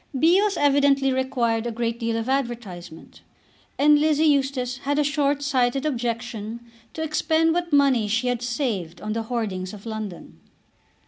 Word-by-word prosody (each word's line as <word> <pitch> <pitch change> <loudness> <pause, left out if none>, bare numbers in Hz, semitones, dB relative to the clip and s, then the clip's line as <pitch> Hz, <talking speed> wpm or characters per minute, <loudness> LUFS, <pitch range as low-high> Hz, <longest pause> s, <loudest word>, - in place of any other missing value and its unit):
Bios 380 +8 +3
evidently 280 -1 +3
required 240 -3 0
a - - -2
great 230 0 -2
deal 230 -1 -1
of 225 +1 -3
advertisement, 235 -11 -4 0.6
and 295 +1 +5
Lizzie 310 +1 +2
Eustace 270 -4 +1
had 285 +1 -1
a 300 - +3
short 285 0 0
sighted 265 0 +1
objection 235 -4 -3 0.4
to 320 - -3
expend 320 +1 +1
what 345 0 -2
money 275 -6 +3
she 225 +4 0
had 245 -1 -1
saved 235 - -3
on 215 0 -4
the 225 - -2
hoardings 215 -5 -3
of 205 - -14
London. 215 -5 -7
250 Hz, 150 wpm, -24 LUFS, 225-285 Hz, 0.6 s, and